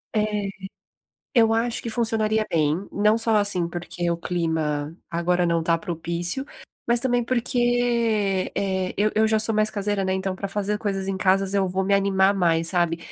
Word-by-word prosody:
É, 210 - +3 1.1
eu 225 -3 +4
acho 230 +1 -1
que 230 - -4
funcionaria 220 -2 0
bem, 160 +4 0
não 210 +2 +2
só, 225 -1 +3
assim, 200 -5 +1
porque 175 0 -4
o 170 - 0
clima 160 -3 -2
agora 175 +1 0
não 170 -1 +1
tá 165 0 +2
propício, 170 +7 -1 0.4
mas 235 0 +3
também 245 -1 +1
porque, 235 -5 0
eh, 190 -2 -2
eu 210 +2 +2
eu 220 0 +3
já 220 - +2
sou 220 +1 +1
mais 215 0 +3
caseira, 205 -1 -1
né, 190 - 0
então 190 0 -2
pra 200 +1 -5
fazer 205 +1 -2
coisas 195 -3 -3
em 195 -1 -3
casa 195 +1 +2
eu 195 -2 +1
vou 190 +1 -1
me 200 - 0
animar 195 0 +3
mais, 165 -3 +2
sabe. 170 -2 +1
195 Hz, 180 wpm, -23 LUFS, 175-220 Hz, 1.1 s, eu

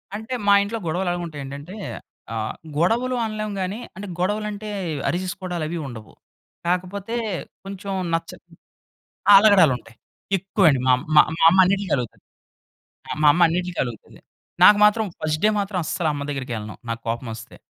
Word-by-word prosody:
అంటే 220 +4 -6
మా 200 - +7
ఇంట్లో 215 +3 -3
గొడవలు 175 +3 -1
ఎలాగుంటాయి 170 -4 -5
ఏంటంటే 145 +7 -8 0.6
ఆహ్, 110 -1 -3 0.2
గొడవలు 235 +10 +1
అనలేము 215 -1 -4
గాని, 190 +3 -3 0.2
అంటే 205 +2 -7
గొడవలంటే 210 +2 -2 0.4
అరిచేసుకోవడాలు 180 -1 -3
అవి 170 - -4
ఉండవు. 110 -4 -10 0.5
కాకపోతే 185 +5 -2 0.5
కొంచెం 195 0 -6 0.2
నచ్చ 165 - -1 1.0
ఆ! - - +10
అలగడాలు 195 -9 +6
ఉంటాయి. 115 -2 -18 0.4
ఎక్కువండి 185 -6 +2
మా 130 - +6 0.2
మా 150 - +10 0.2
మా - - 0
అమ్మ 190 +3 +3
అన్నిటి‌లకి 195 -1 0
అలుగుతది. 120 -3 -6 0.9
ఆ! - - -3
మా - - +6
అమ్మ 175 - 0
అన్నిటిలకి 180 +1 -2
అలుగుతది. 120 -3 -10 0.4
నాకు 210 - +9
మాత్రం 215 +1 +3 0.2
ఫస్ట్ 155 0 -1
డే - - +6
మాత్రం 195 -2 -2
అస్సలు 160 0 -1
అమ్మ 145 0 -4
దగ్గరికెళ్ళను. 120 -7 -5
నాకు 115 0 -3
కోపం 115 +1 -3
ఒస్తే. 110 0 -12
180 Hz, 150 wpm, -23 LUFS, 145-200 Hz, 1.0 s, ఆ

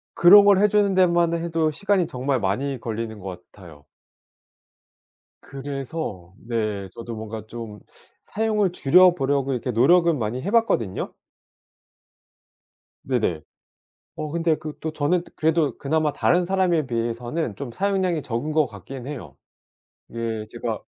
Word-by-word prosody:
그런 200 +4 +8
걸 200 -1 +6
해 210 +2 +4
주는 205 -1 +2
데만 175 -2 +3
해도 165 -2 0
시간이 195 +1 +1
정말 130 0 -1
많이 125 +8 -1
걸리는 115 -1 -5
것 90 -2 -8
같아요. 85 -8 -15 1.6
그래서 135 - -6
네 110 -4 -3
저도 115 0 -7
뭔가 110 0 -7
좀 115 -3 -8 0.4
사용을 210 -3 0
줄여 180 +3 +5
보려고 135 -1 0
이렇게 125 0 -2
노력은 165 +7 +4
많이 115 +2 -2
해 190 - -3
봤거든요. 120 - +1 1.9
네네. 110 -11 0 0.8
어 155 -1 -5
근데 165 -1 +1
그 155 -1 -8
또 160 -1 -4
저는 155 +4 +1
그래도 160 -1 +1
그나마 155 +1 0
다른 175 0 +2
사람에 175 -5 +1
비해서는 120 +3 -3
좀 140 -4 -6
사용량이 185 0 0
적은 125 +4 -3
것 155 -1 +3
같긴 125 +4 -9
해요. 90 - -8 0.8
예 115 -2 -3
제가 - - -4
140 Hz, 265 characters per minute, -23 LUFS, 115-170 Hz, 1.9 s, 그런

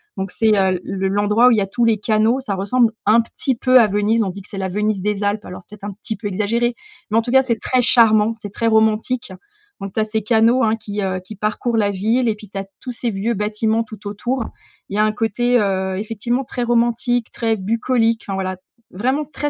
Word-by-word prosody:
donc 190 0 -4
c'est, 220 -2 +2
heu, 190 -2 +2
le 195 0 -2
l'endroit 205 +4 +3
où - - +6
il 230 - +3
y 205 - +2
a 195 - -1
tous 235 +4 -1
les 225 -2 +3
canaux. 220 +4 +2
Ça 205 -7 -3
ressemble 220 +4 +2
un 215 +3 +5
petit 255 +3 -3
peu 255 +2 +4
à 225 - +5
Venise, 210 +3 +1
on 195 - -2
dit 195 +2 -7
que 195 - -15
c'est 200 - -7
la 190 -1 -2
Venise 210 +1 -1
des 205 +1 -1
Alpes. 205 +1 -1
Alors 180 +1 -8
c'est 210 +3 -14
peut-être 205 +1 -7
un - - -10
petit 220 - -4
peu 205 +1 -5
exagéré 230 +5 0 0.4
mais 220 - +3
en - - +5
tout 240 +1 -5
cas, 265 - +6
c'est 235 -4 -1
très 255 -1 +1
charmant, 225 -3 +4
c'est 205 -2 -8
très 230 - -1
romantique, 220 0 +1 0.5
donc 195 -1 -6
tu - - -1
as - - +3
ces 220 -1 -2
canaux, 230 +3 +3
hein, 225 0 +2
qui, 205 -1 -5
heu, 185 -1 -1
qui 185 +4 -11
parcourent 215 +3 -1
la 205 -2 +2
ville 225 +6 +1
et 215 - 0
puis, 210 0 -13
tu 200 - -8
as 195 - -3
tous 250 -2 -6
ces 235 0 -2
vieux 215 +3 -1
bâtiments 220 +2 0
tout 215 -2 -10
autour. 240 +4 -2 0.4
Il 200 - -5
y - - 0
a - - +5
un 215 - +2
côté, 240 +3 +1
heu, 190 -2 -1
effectivement 230 +5 -2
très 245 - -3
romantique, 240 0 +1
très 225 -1 0
bucolique, 230 +3 0
enfin 195 - -3
voilà, 185 -1 -2 0.4
vraiment 260 +10 -1
très 295 0 -4
220 Hz, 250 wpm, -19 LUFS, 205-235 Hz, 0.5 s, où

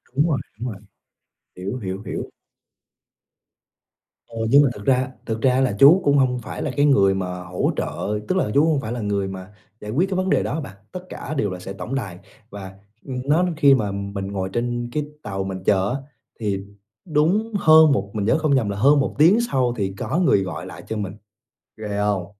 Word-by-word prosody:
Đúng 145 +4 +3
rồi, 145 - +1 0.2
đúng 125 +2 -3
rồi. 100 -1 -10 0.8
Hiểu, 95 +6 -4
hiểu, 95 -4 -5
hiểu. - - -5 2.0
Ờ, 115 - -11
nhưng 140 +4 +7
mà 140 - +3
thực 100 -2 -10
ra 130 -1 +2 0.2
thực 110 -1 -3
ra 130 0 +3
là 125 -7 +1
chú 160 +8 +8
cũng 145 0 +3
hông 125 -2 +2
phải - - -6
là - - -2
cái 145 - +4
người 100 -9 +4
mà 95 -1 -2 0.2
hỗ 90 0 -1
trợ 105 +1 -2
tức - - 0
là - - +1
chú 145 +2 +4
hông 155 -4 +1
phải 110 - -5
là 120 - -3
người 100 -2 -1
mà 95 +1 -8 0.3
giải 105 - -6
quyết 175 - +1
cái 190 - -1
vấn 185 0 0
đề - - +2
đó - - -3
á 155 - -2
bạn. 140 -11 -8 0.2
Tất 185 - -5
cả 150 - -6
đều 105 -6 +1
là 90 - -6
sẽ 95 +2 -7
tổng 120 +6 -5
đài 95 -9 -4 0.3
và, 95 -3 -9 0.3
ừm, 130 -2 -4
nó 155 +6 +3
khi 140 -3 +6
mà 105 -6 -1
mình 100 0 -4
ngồi 95 -1 -3
trên 120 0 -2
cái 150 +3 -2 0.2
tàu 95 -2 -3
mình 95 -1 -5
chờ 100 -1 +2
á, - - -1 0.4
thì 100 -3 -1 0.5
đúng 180 +8 +1
hơn 160 -2 +7
một 100 -7 0
mình 105 -2 -2
nhớ 110 - +3
không 155 -3 +2
nhầm 115 -6 +1
là 100 - -3
hơn 140 +7 +5
1 135 - -1
tiếng 170 +9 +6
sau 125 -3 +1
thì 95 -2 -2
có 155 - -2
người 145 - +3
gọi 95 - -6
lại - - -10
cho 110 - -3
mình, 100 -2 -4 0.6
ghê 105 -2 -4
hông? 105 -3 0
115 Hz, 220 wpm, -22 LUFS, 100-145 Hz, 2.0 s, chú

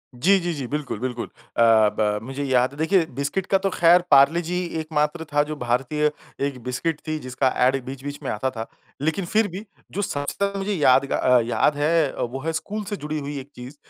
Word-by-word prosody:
जी, 190 +11 +4
जी, 175 -1 -2
जी, 140 -4 -4
बिल्कुल, 145 -5 -4
बिल्कुल। 125 -1 -3
अ, - - -6 0.4
ब 105 -1 +1
मुझे 135 +2 -4
याद 130 -1 +2
है 140 - -13
देखिए 165 +3 +2
बिस्किट 140 +8 -2
का - - +7
तो 195 +1 -1
ख़ैर 175 -1 +5
पार्ले 140 +5 +6
जी 180 +2 -2 0.2
एक 155 - -5
मात्र 150 +2 0
था 145 0 +4
जो 155 +1 -5
भारतीय 135 +4 0 0.3
एक 140 -3 -4
बिस्किट 135 +6 -2
थी 155 0 -1
जिसका 130 0 -1 0.2
ऐड 130 0 +2
बीच-बीच 135 +2 -6
में 135 - -3
आता 120 +5 -1
था। 115 -3 -6 0.3
लेकिन 160 +5 0
फिर 215 +5 +2
भी 195 +4 -7 0.3
जो 205 - -2
सबसे 145 -7 -2
ज़्यादा 200 0 0
मुझे 200 +2 -1
यादगा 135 -5 +4
याद 120 +5 +2
है 150 0 +2
वो 125 +3 -3
है 165 - -1
स्कूल 210 +6 -4
से 205 +1 -4
जुड़ी 150 -1 -4
हुई 145 0 -5
एक 135 +1 -11
चीज़। 125 +3 -9
145 Hz, 210 wpm, -23 LUFS, 130-170 Hz, 0.4 s, का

